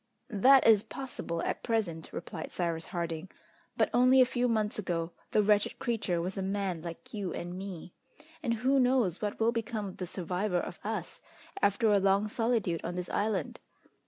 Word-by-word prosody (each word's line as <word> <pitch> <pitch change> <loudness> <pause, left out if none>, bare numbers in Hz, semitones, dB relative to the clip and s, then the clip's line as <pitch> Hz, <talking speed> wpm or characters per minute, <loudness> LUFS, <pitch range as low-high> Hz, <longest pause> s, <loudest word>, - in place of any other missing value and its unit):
"That 260 +7 +6
is 220 -3 +7
possible 215 -11 -5
at - - -2
present," 195 -9 -1
replied 165 -1 -6
Cyrus 170 -2 -2
Harding; 170 -1 -4 0.5
"but - - +2
only 255 +2 +6
a 255 - +8
few 250 0 0
months 215 -3 0
ago 170 -4 -2 0.2
the 210 - +3
wretched 205 0 +2
creature 210 -7 -1
was 185 +3 -3
a - - -1
man 190 -3 -2
like 170 0 -8
you 200 -4 -3
and 175 +1 -5
me. 185 -2 -7 0.5
And 235 -6 0
who 260 +4 +2
knows 250 -8 +2
what 210 -1 -3
will 225 +1 +3
become 230 -2 -3
of 190 - -7
the 180 - -4
survivor 180 +2 -2
of - - -6
us - - -4 0.4
after 205 +2 +3
a 205 - +5
long 195 +2 +3
solitude 225 -7 0
on 175 - -4
this 180 -1 -4
island? 205 -6 -1
200 Hz, 180 wpm, -30 LUFS, 175-225 Hz, 0.5 s, a